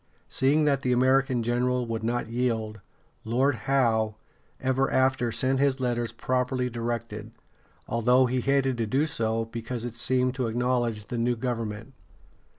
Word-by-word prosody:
Seeing 145 Hz, +4 st, +2 dB
that 140 Hz, -2 st, +2 dB
the 125 Hz, -, 0 dB
American 130 Hz, 0 st, +2 dB
general 125 Hz, +1 st, 0 dB
would 115 Hz, -1 st, -4 dB
not 120 Hz, +1 st, -1 dB
yield, 115 Hz, -2 st, -2 dB, 0.4 s
Lord 130 Hz, +5 st, +2 dB, 0.2 s
Howe 110 Hz, -5 st, +2 dB, 0.4 s
ever 130 Hz, +1 st, +1 dB
after 130 Hz, -2 st, +2 dB
sent 130 Hz, +4 st, +1 dB
his 140 Hz, -1 st, +2 dB
letters 120 Hz, -3 st, -1 dB
properly 125 Hz, +1 st, -1 dB
directed, 115 Hz, -2 st, -4 dB, 0.6 s
although 125 Hz, +3 st, +3 dB
he 125 Hz, 0 st, 0 dB
hated 135 Hz, -2 st, +1 dB
to 115 Hz, -, 0 dB
do 135 Hz, +8 st, +1 dB
so, 115 Hz, -6 st, -1 dB
because 115 Hz, +1 st, -5 dB
it 120 Hz, -, -5 dB
seemed 125 Hz, +2 st, +1 dB
to 130 Hz, -3 st, -2 dB
acknowledge 120 Hz, -2 st, -1 dB
the 120 Hz, -, -3 dB
new 120 Hz, +1 st, +1 dB
government. 115 Hz, 0 st, -4 dB
125 Hz, 150 wpm, -27 LUFS, 115-130 Hz, 0.6 s, although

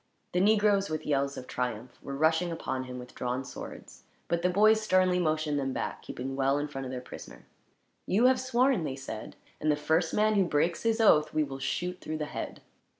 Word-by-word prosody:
The 180 Hz, -, +1 dB
negroes, 205 Hz, -1 st, +3 dB
with 155 Hz, 0 st, -3 dB
yells 140 Hz, -1 st, 0 dB
of 130 Hz, -, -6 dB
triumph, 125 Hz, -1 st, -4 dB
were 140 Hz, -, -6 dB
rushing 160 Hz, +3 st, +2 dB
upon 130 Hz, -5 st, -3 dB
him 125 Hz, 0 st, -7 dB
with 125 Hz, 0 st, -10 dB
drawn 125 Hz, +2 st, -3 dB
swords; -, -, -9 dB, 0.3 s
but 170 Hz, 0 st, +1 dB
the 180 Hz, -, +2 dB
boys 215 Hz, +4 st, +5 dB
sternly 185 Hz, -3 st, +3 dB
motioned 155 Hz, -3 st, 0 dB
them 135 Hz, -1 st, -2 dB
back, -, -, -4 dB
keeping 135 Hz, +2 st, -5 dB
well 135 Hz, +1 st, +2 dB
in 145 Hz, +1 st, -2 dB
front 135 Hz, -2 st, -6 dB
of 130 Hz, -, -5 dB
their 125 Hz, -1 st, -4 dB
prisoner. -, -, -11 dB, 0.6 s
"You 220 Hz, +6 st, +3 dB
have 260 Hz, 0 st, +4 dB
sworn," 255 Hz, -4 st, +2 dB
they 140 Hz, -4 st, -3 dB
said, 130 Hz, -5 st, -7 dB, 0.2 s
"and 155 Hz, -, +2 dB
the -, -, +3 dB
first 160 Hz, +3 st, +1 dB
man 215 Hz, +1 st, +3 dB
who 200 Hz, -3 st, +3 dB
breaks 170 Hz, +1 st, +1 dB
his 225 Hz, 0 st, +1 dB
oath 155 Hz, -9 st, +4 dB
we 155 Hz, -, +3 dB
will 135 Hz, -2 st, -6 dB
shoot 180 Hz, +6 st, -3 dB
through 155 Hz, -, -4 dB
the 150 Hz, -, -2 dB
head." -, -, -6 dB
155 Hz, 210 wpm, -29 LUFS, 135-185 Hz, 0.6 s, boys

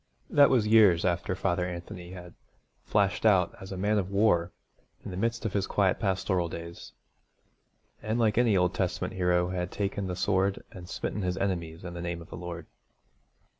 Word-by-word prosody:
That 145 Hz, -1 st, +6 dB
was 120 Hz, -5 st, +3 dB
years 105 Hz, -6 st, +5 dB
after 90 Hz, 0 st, 0 dB
Father 90 Hz, -1 st, 0 dB
Anthony 85 Hz, 0 st, -7 dB
had 90 Hz, -1 st, -10 dB, 0.5 s
flashed 100 Hz, -2 st, +1 dB
out 95 Hz, -5 st, +4 dB
as 95 Hz, +1 st, -9 dB
a 95 Hz, -, -5 dB
man 105 Hz, +3 st, +1 dB
of 95 Hz, -1 st, -3 dB
war 100 Hz, -4 st, +2 dB, 0.5 s
in -, -, -5 dB
the -, -, -6 dB
midst 115 Hz, +4 st, -1 dB
of 110 Hz, -, -2 dB
his 100 Hz, -1 st, 0 dB
quiet 95 Hz, -2 st, +1 dB
pastoral 95 Hz, -3 st, 0 dB
days, 85 Hz, +1 st, -8 dB, 1.1 s
and 110 Hz, +2 st, -1 dB
like 110 Hz, -3 st, +2 dB
any 115 Hz, -5 st, +4 dB
Old 90 Hz, 0 st, +2 dB
Testament 95 Hz, -1 st, -2 dB
hero 90 Hz, -1 st, +1 dB
had 90 Hz, -1 st, -3 dB
taken 100 Hz, 0 st, -3 dB
the 90 Hz, -, -3 dB
sword 95 Hz, +1 st, 0 dB
and 90 Hz, -4 st, -11 dB
smitten 105 Hz, -, -3 dB
his 90 Hz, 0 st, -1 dB
enemies 85 Hz, -4 st, -3 dB
in 90 Hz, -, -6 dB
the 85 Hz, -, -6 dB
name 85 Hz, 0 st, -3 dB
of 85 Hz, -, -13 dB
the -, -, -6 dB
Lord. 85 Hz, -2 st, -7 dB
95 Hz, 185 wpm, -28 LUFS, 90-100 Hz, 1.1 s, That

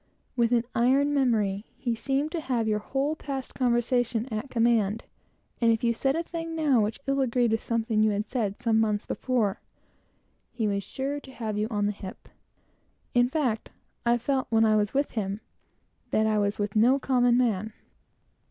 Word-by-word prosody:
With 235 Hz, -1 st, +2 dB
an 235 Hz, -1 st, +3 dB
iron 270 Hz, +5 st, +3 dB
memory, 220 Hz, -7 st, +1 dB
he 240 Hz, -, -1 dB
seemed 275 Hz, +6 st, -1 dB
to 335 Hz, -, -2 dB
have 245 Hz, -6 st, -1 dB
your 210 Hz, -1 st, +1 dB
whole 275 Hz, +7 st, -1 dB
past 270 Hz, -4 st, -5 dB
conversation 240 Hz, -1 st, +1 dB
at 215 Hz, +5 st, -3 dB
command, 230 Hz, -3 st, +2 dB, 0.6 s
and 230 Hz, -1 st, +5 dB
if 225 Hz, 0 st, 0 dB
you 235 Hz, -1 st, +3 dB
said 270 Hz, +4 st, 0 dB
a 335 Hz, -, -1 dB
thing 330 Hz, -1 st, -5 dB
now 290 Hz, -7 st, +3 dB
which 210 Hz, +1 st, -2 dB
ill 275 Hz, 0 st, +1 dB
agreed 245 Hz, -2 st, +2 dB
with 225 Hz, -, +1 dB
something 215 Hz, -3 st, +1 dB
said 210 Hz, -4 st, -2 dB
months 220 Hz, -2 st, +2 dB
before, 235 Hz, -7 st, -1 dB, 0.9 s
he 220 Hz, -3 st, -1 dB
was 200 Hz, -1 st, -1 dB
sure 275 Hz, +7 st, -3 dB
to 270 Hz, -, -13 dB
have 220 Hz, -4 st, -4 dB
you 210 Hz, +1 st, 0 dB
on 205 Hz, -3 st, 0 dB
the 205 Hz, -, +1 dB
hip. 195 Hz, -2 st, -10 dB, 0.8 s
In 245 Hz, 0 st, +4 dB
fact, 255 Hz, -7 st, -1 dB, 0.3 s
I 235 Hz, -, +3 dB
always 240 Hz, -1 st, -1 dB
felt, 270 Hz, 0 st, 0 dB
when 225 Hz, -1 st, +3 dB, 0.3 s
with 280 Hz, +1 st, 0 dB
him, 200 Hz, -2 st, -3 dB, 0.7 s
that 220 Hz, -, +2 dB
I 215 Hz, -1 st, +2 dB
was 200 Hz, 0 st, 0 dB
with 205 Hz, 0 st, -3 dB
no 240 Hz, +5 st, +5 dB
common 245 Hz, -3 st, +3 dB
man. 220 Hz, -4 st, +1 dB
235 Hz, 170 wpm, -27 LUFS, 215-265 Hz, 0.9 s, and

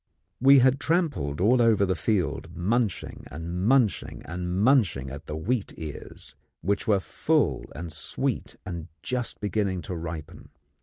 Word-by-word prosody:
We 135 Hz, +2 st, +7 dB
had 130 Hz, +1 st, +5 dB
trampled 150 Hz, -, 0 dB
all 120 Hz, +7 st, +4 dB
over 110 Hz, -4 st, +4 dB
the 95 Hz, -, +1 dB
field 95 Hz, -2 st, -1 dB
munching 105 Hz, +3 st, -1 dB
and 85 Hz, +5 st, -4 dB
munching 125 Hz, -7 st, +2 dB
and 90 Hz, +2 st, -3 dB
munching 100 Hz, -, +3 dB
at 70 Hz, +2 st, -9 dB
the 75 Hz, -, -4 dB
wheat 105 Hz, +7 st, -2 dB
ears, 80 Hz, -3 st, -8 dB, 0.3 s
which 100 Hz, +6 st, 0 dB
were 105 Hz, -3 st, +4 dB
full -, -, 0 dB
and 85 Hz, +3 st, -6 dB
sweet -, -, -2 dB
and 85 Hz, -3 st, -5 dB, 0.2 s
just 125 Hz, -2 st, -3 dB
beginning 100 Hz, -4 st, -1 dB
to 90 Hz, -, -5 dB
ripen. 80 Hz, -2 st, -7 dB
95 Hz, 145 wpm, -27 LUFS, 85-120 Hz, 0.3 s, We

